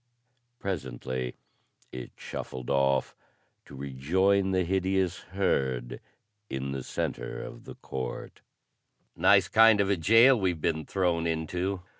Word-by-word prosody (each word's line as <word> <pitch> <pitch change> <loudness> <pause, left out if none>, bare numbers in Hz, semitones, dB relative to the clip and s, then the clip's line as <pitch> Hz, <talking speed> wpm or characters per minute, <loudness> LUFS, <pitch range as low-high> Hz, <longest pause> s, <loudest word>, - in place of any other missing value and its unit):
Presently 65 - -4 0.6
it 65 -1 -7
shuffled 65 0 -6
off 70 -1 +1 0.5
to 70 - -12
rejoin 90 +9 +1
the 95 -1 +2
hideous 95 0 0 0.2
herd 65 -3 0 0.5
in 65 +1 -3
the 70 -1 -3
center - - -4
of - - -10
the - - -9
court. 65 -2 -6 0.7
"Nice - - +5
kind 110 -1 +6
of 100 0 +2
a 100 - +2
jail 115 +9 +6
we've 90 -4 0
been 80 -1 -1
thrown 85 -3 0
into. 90 +4 -2
80 Hz, 120 wpm, -28 LUFS, 65-95 Hz, 0.7 s, kind